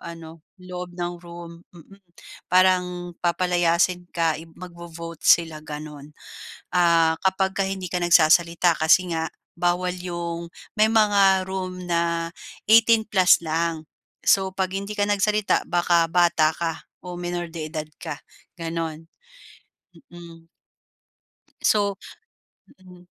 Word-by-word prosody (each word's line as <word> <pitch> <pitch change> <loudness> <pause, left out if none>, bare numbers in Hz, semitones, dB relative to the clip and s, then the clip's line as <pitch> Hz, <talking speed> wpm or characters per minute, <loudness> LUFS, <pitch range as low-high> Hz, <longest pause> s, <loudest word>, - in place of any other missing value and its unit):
ano 165 -1 -10 0.2
sa 185 - -18
loob 180 -1 -8
ng 175 0 -3
room, 170 -1 -11
mm. 180 +3 -17 0.5
Parang 180 -1 +2
papalayasin 175 0 +1
ka, 165 -1 +1
ib 165 0 -14
magvo-vote 170 -2 -10
sila 165 -2 +3
gano'n, 150 -1 -9 0.6
ah, 165 -2 +4
kapag 190 0 +1
ka 195 - +1
hindi 190 -1 -5
ka 180 +1 -2
nagsasalita 170 0 +4
kasi 170 +3 +3
nga 160 0 -2 0.3
bawal 180 +1 0
'yong 170 -1 -5 0.2
may 215 +1 +4
mga 200 -3 +4
room 185 -1 -5
na, 170 -1 0 0.4
18 225 0 +5
plus 185 -3 +5
lang. 160 -1 -2 0.4
So, 190 -1 +3
'pag 185 0 -2
hindi 200 +1 -5
ka 205 - +2
nagsalita 210 +1 +1
baka 175 -1 +2
bata 170 -2 +3
ka 165 -2 -4 0.2
o 180 -1 -7
menor 175 -1 -4
de 160 -2 -5
edad 155 -2 -4
ka 160 -4 -6 0.4
gano'n. 165 -1 -5 1.0
Mm. 170 -1 -13 1.1
So, 200 -2 +2 0.9
mm. 180 -1 -16
175 Hz, 120 wpm, -23 LUFS, 165-185 Hz, 1.1 s, 18